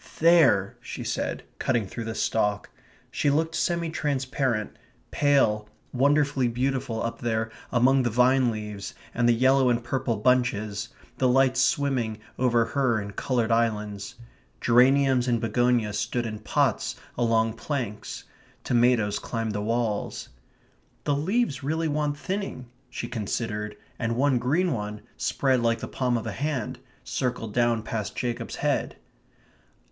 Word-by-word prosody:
"There!" 160 - +4
she - - -6
said, - - -2 0.2
cutting 120 -5 +1
through 115 +4 -6
the 115 0 -4
stalk. 105 -3 0 0.4
She 145 - +1
looked 160 +3 +1
semi 170 -1 0
transparent, 130 -6 -1 0.4
pale, 110 -8 +2 0.2
wonderfully 140 0 +3
beautiful 125 -1 -1
up 115 - -3
there 110 -1 -1 0.2
among 130 +2 +4
the 120 - +1
vine 125 +2 +4
leaves 105 -2 -5 0.2
and 120 0 +2
the - - +7
yellow 130 +2 +4
and 120 -1 +1
purple 120 -2 -1
bunches, 110 -3 +1 0.3
the 130 - +3
lights 130 0 +3
swimming 130 -6 +1 0.2
over 120 -2 +3
her 130 -4 +1
in 100 -1 -6
coloured 120 +2 -1
islands. 105 -3 -1 0.4
Geraniums 130 +1 +4
and 120 -2 +2
begonias 115 -1 +1
stood 120 -1 -1
in 110 -1 -5
pots 110 - 0 0.2
along 115 -2 +2
planks; 115 -7 -4 0.4
tomatoes 120 -4 +2
climbed 115 -2 -3
the 105 - -2
walls. 110 -1 -2 0.7
"The 145 - +1
leaves 160 - 0
really 160 +4 -1
want 150 -1 -1
thinning," 190 -6 -4 0.2
she - - -5
considered, 105 -2 -3 0.2
and 115 0 -1
one 135 0 +2
green 160 +9 +1
one, 105 -1 -4
spread 130 -3 +1
like 115 0 +2
the - - -6
palm 125 -2 0
of 115 - -5
a 110 - -3
hand, 135 +1 -3 0.2
circled 115 -4 -3
down 120 -2 +2
past 110 -2 -4
Jacob's 120 -1 -3
head. - - -1
120 Hz, 140 wpm, -26 LUFS, 110-135 Hz, 0.7 s, the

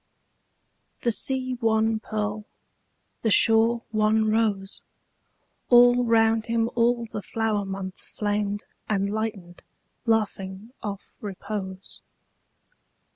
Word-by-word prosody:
The 235 - +3
sea 255 +2 0
one 220 -1 +2
pearl, 210 -1 -3 0.8
the 225 - +1
shore 225 +2 +4
one 215 0 +2
rose, 210 -3 0 0.9
All 245 0 +7
round 225 -1 +3
him 230 0 0
all 235 0 +2
the 215 -2 -6
flower 215 0 -1
month 190 -1 -6
flamed 205 -1 -2 0.3
And 200 -1 0
lightened, 205 -5 -4 0.5
laughing 210 -1 -1
off 200 -2 -6
repose. 195 -1 -6
220 Hz, 95 wpm, -25 LUFS, 200-225 Hz, 0.9 s, All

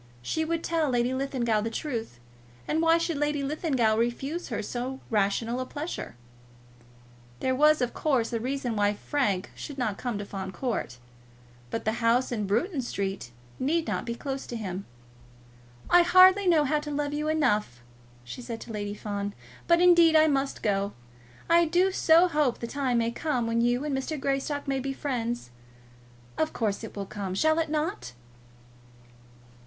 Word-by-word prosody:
She 320 - -1
would 330 +1 -2
tell 325 -3 0
Lady 245 0 +1
Linlithgow 255 -5 0
the 225 - -2
truth, 230 - -4 0.5
and 315 - +1
why 330 0 +5
should 335 -2 -1
Lady 295 -1 0
Linlithgow 275 -6 +1
refuse 270 +9 -2
her 225 -3 -3
so 255 +4 -4
rational 225 +3 +1
a 255 - -2
pleasure? 295 - -5 1.2
There 260 - 0
was, 300 +2 +4
of 245 - -2
course, 255 -6 0
a 230 - 0
reason 250 -1 -2
why 205 0 +2
Frank 205 -7 -1
should 285 - -8
not 220 -6 -2
come 245 -4 -2
to 205 - -5
Fawn 190 -1 -6
Court; 220 - -3 0.7
but 225 - -4
the 220 +2 0
house 235 +3 +2
in 210 -4 -2
Bruton 265 - 0
Street 195 - -4 0.3
need 320 +5 +1
not - - -2
be 235 - -2
closed 270 +1 -5
to 240 - -4
him. 195 -3 -5 1.0
"I 350 - +6
hardly 370 +3 +6
know 325 -4 +5
how 300 +2 +1
to 295 0 -7
love 290 0 -2
you 300 +1 -2
enough," 215 - 0 0.4
she 125 - -8
said 235 -2 -6
to - - -8
Lady 205 -1 -4
Fawn, 205 -1 -4 0.3
"but 340 0 +5
indeed 345 -2 +6
I 310 0 +7
must 275 -2 0
go. 200 -1 0 0.5
I 335 0 +5
do 355 +4 +2
so 340 -1 +5
hope 300 -7 +1
the - - -5
time 255 0 -1
may 230 0 +1
come 250 -2 -1
when 230 0 +1
you 245 +3 +1
and 290 -2 -1
Mr. 270 +3 -3
Greystock 275 +2 -2
may 270 -1 0
be 270 +1 -3
friends. 240 - -3 0.9
Of 315 - 0
course, 215 -2 -1
it 220 - -8
will 200 -1 -4
come. 195 -2 -5
Shall 315 +8 +3
it 320 - -1
not?" 300 - -2
260 Hz, 175 wpm, -27 LUFS, 225-305 Hz, 1.2 s, I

